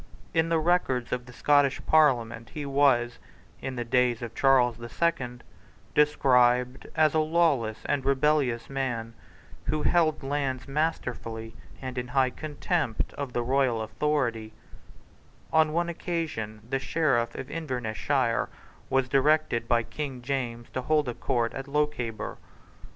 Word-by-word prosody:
In 165 0 +2
the 165 - +3
Records 155 -7 +1
of 125 0 -3
the - - -10
Scottish 145 +1 +3
Parliament 120 -7 +3
he 150 -2 -4
was, 135 -4 +2 0.4
in 130 - -4
the 120 -1 -3
days 125 -1 +2
of 115 -1 -6
Charles 125 -3 +3
the 120 0 -7
Second, 125 -8 -1 0.5
described 125 -3 +3
as 155 -2 +4
a 160 - +3
lawless 155 -9 +1
and 145 -2 0
rebellious 135 -3 +1
man, 120 -4 -3 0.5
who 155 0 -1
held 160 -4 +2
lands 135 -2 -2
masterfully 120 -7 -3 0.3
and 130 -1 -4
in 125 - -4
high 130 0 +2
contempt 150 - -2
of 140 -3 -5
the 120 - 0
royal 130 -2 +2
authority, 115 -3 -1 1.0
On 160 -1 +4
one 170 +2 0
occasion 160 - -4
the 135 +2 -1
Sheriff 135 -4 +1
of 130 - -7
Invernessshire 130 -4 -1 0.4
was 135 -1 +2
directed 135 -3 +2
by 120 -1 +3
King 135 -2 -6
James 120 -3 -3
to 130 - -3
hold 150 0 +1
a - - -2
court 120 0 -1
in 135 +1 -7
Lochaber. 140 -7 -2
130 Hz, 140 wpm, -27 LUFS, 120-150 Hz, 1.0 s, as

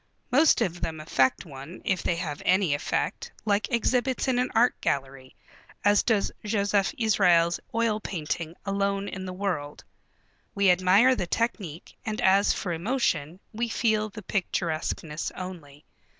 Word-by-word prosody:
Most 290 0 +5
of 175 -6 -1
them 160 -1 -3
affect 130 -4 +1
one, 140 +3 -10
if 190 -2 +1
they 170 - 0
have 160 -4 -4
any 185 -5 +3
effect, 145 - -2
like 205 -1 +1
exhibits 250 +3 +1
in 250 -2 +2
an 250 - 0
art 240 +2 +5
gallery, 135 -1 -3 0.5
as 205 0 +5
does 220 -4 +1
Josef 205 -2 +1
Israels' 180 -7 +3 0.2
oil 230 -2 +1
painting, 165 -3 -4
Alone 200 0 -1
in 190 -1 -6
the - - -4
World. 145 -6 -3 0.7
We 200 -2 +5
admire 185 +8 +5
the 180 -7 -3
technique, 190 -7 -3
and 220 -1 -3
as 200 -2 +4
for 180 -4 -2
emotion, 170 - -1
we 235 +2 -2
feel 215 -2 +1
the 215 +1 -10
picturesqueness 165 -4 -2
only. 165 -6 -9
190 Hz, 145 wpm, -27 LUFS, 165-215 Hz, 0.7 s, Most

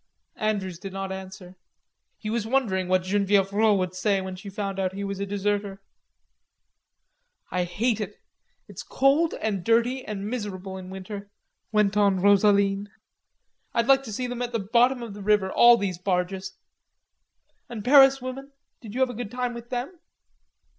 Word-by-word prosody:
Andrews 195 -5 -2
did 195 -1 -8
not 195 0 -4
answer. 190 -1 -8 0.6
He 215 - -5
was 225 -1 -1
wondering 220 -8 0
what 185 0 +2
Genevieve 200 0 +1
Rod 215 0 +4
would 185 -1 -2
say 195 +2 +1
when 190 -1 -5
she 195 +2 -9
found 195 -1 -4
out 190 -1 -1
he 200 - -4
was 200 -1 -4
a 200 - -3
deserter. 200 0 -2 1.7
"I 180 -1 0
hate 215 +5 -1
it.... 210 0 -6 0.5
It's - - -8
dirty 275 +4 +3 0.2
and 200 -5 -1
cold 235 +2 +3
and 205 -1 -4
miserable 200 -5 -5
in 185 -1 -8
winter," 200 +2 -8 0.4
went 210 -2 +2
on 200 -2 +3
Rosaline. 200 0 +3 0.9
"I'd 235 - +2
like 270 +1 +5
to 220 - -7
see 250 +5 -3
them 245 0 -4
at 245 0 -3
the 230 - 0
bottom 245 +1 +4
of 225 -3 -7
the 205 - -9
river, 200 -2 +2
all 240 0 +7
these 190 -5 -3
barges.... 185 0 -2 1.1
And 225 -4 -7
Paris 270 0 +7
women, 270 +2 -7 0.3
did 220 -2 -10
you 260 - -1
have 260 -1 +2
a - - -8
good 235 -2 -5
time 250 +1 -3
with 235 0 -9
them?" 255 +8 -4
205 Hz, 170 wpm, -25 LUFS, 190-235 Hz, 1.7 s, all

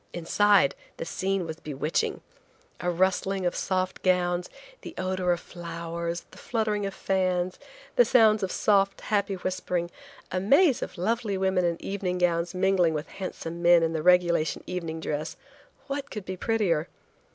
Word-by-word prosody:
Inside, 185 -2 +3 0.2
the - - -4
scene 190 +1 -1
was 160 0 -6
bewitching. 150 +1 -2 0.6
A 180 - -1
rustling 190 +2 +1
of 175 - 0
soft 185 0 -1
gowns, 180 -1 +1 0.3
the - - -9
odor 185 -1 0
of 175 - +1
flowers, 170 0 -5
the - - -14
fluttering 215 -4 -1
of 195 - -7
fans, 185 -1 0 0.4
the - - +8
sounds 220 - +5
of 190 -2 -1
soft, 195 -2 +2
happy 200 -2 0
whispering, 180 -2 -2 0.4
a 185 - 0
maze 275 - +4
of - - -5
lovely 210 +2 -1
women 190 -1 +1
in 170 -1 0
evening 190 -2 -3
gowns 175 0 +1
mingling 185 -3 +3
with 150 +1 -4
handsome 170 -3 -6
men 170 -1 +6
in 165 0 0
the 160 - -1
regulation 175 -2 +3
evening 165 -3 -4
dress–what 275 - -6
could 210 -3 -6
be 185 - -4
prettier? 185 -6 0
185 Hz, 150 wpm, -27 LUFS, 170-195 Hz, 0.6 s, the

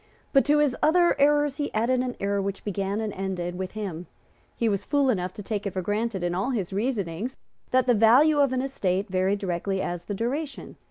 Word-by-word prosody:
But 275 - +6
to 295 +1 +4
his 295 -4 +2
other 345 +2 +4
errors 290 0 +3
he 290 -1 -2
added 240 +4 +2
an 250 -1 -2
error 200 0 0
which 195 0 -4
began 200 0 -2
and 215 -2 -3
ended 185 -2 -3
with 185 +1 -5
him. 185 -5 -5 0.5
He 235 - +1
was 200 -3 0
fool 285 -3 +2
enough 180 -4 -2
to 205 - -8
take 205 0 -3
it 195 - -4
for 185 - -2
granted, 205 -1 -1
in 175 0 0
all 195 +8 -1
his 200 -8 -2
reasonings, 210 0 -2 0.3
that 255 0 +3
the 250 - +4
value 255 +8 +5
of 280 -2 +4
an 260 0 0
estate 195 -7 -1
varied 190 +2 +1
directly 190 0 -2
as 175 -2 -3
the 205 - -4
duration. 270 +6 -4
210 Hz, 215 wpm, -26 LUFS, 190-260 Hz, 0.5 s, But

